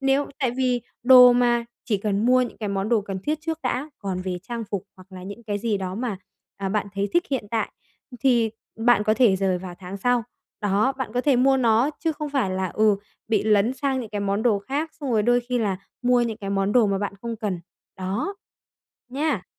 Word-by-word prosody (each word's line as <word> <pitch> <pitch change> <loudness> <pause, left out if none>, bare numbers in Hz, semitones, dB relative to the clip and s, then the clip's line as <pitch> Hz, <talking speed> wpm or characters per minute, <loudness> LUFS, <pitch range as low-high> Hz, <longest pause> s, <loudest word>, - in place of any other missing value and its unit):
nếu 275 +1 +2
tại 265 -4 +1
vì 250 -1 0 0.2
đồ 250 -1 +9
mà, 240 -1 +2 0.2
chỉ 215 -3 +1
cần 205 +2 0
mua 255 0 +5
những 245 - -5
cái 210 -2 -3
món 195 +1 -1
đồ 230 -2 +3
cần 195 -1 -5
thiết 305 +1 -1
trước 325 0 -3
đã, 260 +4 -2
còn 190 -2 -3
về 185 -1 -3
trang 235 -1 -3
phục 200 -2 -3
hoặc 185 +1 -17
là 185 -1 -9
những 200 +5 -8
cái 205 -2 -3
gì 215 -2 -1
đó 185 -1 -4
mà, 230 -3 -3 0.4
à, 195 -1 -3
bạn 210 0 -1
thấy 200 +1 -1
thích 345 0 +3
hiện 260 -6 -1
tại, 225 -1 -1 0.4
ừm, 245 - -10
thì 235 -4 +3 0.3
bạn 225 -2 +4
có 215 +1 +3
thể 225 -7 +4
dời 185 -2 +1
vào 180 -1 -8
tháng 190 +1 -7
sau. 245 +3 +1 0.4
Đó, 210 +6 +2
bạn 245 -5 -3
có 245 - +2
thể 270 -2 +3
mua 265 +2 +4
nó 240 +3 +3
chứ 325 -1 0
không 300 0 -5
phải 265 -9 0
là, 185 0 -1
ừ, 215 +1 +3 0.3
bị 215 -3 +2
lấn 215 +3 +3
sang 270 -1 -1
những 225 -4 -7
cái 205 -1 -3
món 200 +2 0
đồ 220 -5 +3
khác 285 +10 -3
xong 275 -3 -3
rồi 215 -2 +3
đôi 245 +2 +3
khi 250 -1 +1
là 200 -4 0 0.3
mua 245 0 +4
những 225 -2 -2
cái 195 -1 -5
món 195 +1 +1
đồ 240 -4 +5
mà 195 -1 0
bạn 205 -1 -2
không 235 -1 -4
cần. 200 -6 -3 0.4
Đó! 200 - -3 0.7
Nha! 275 - -1
225 Hz, 235 wpm, -24 LUFS, 200-250 Hz, 0.7 s, đồ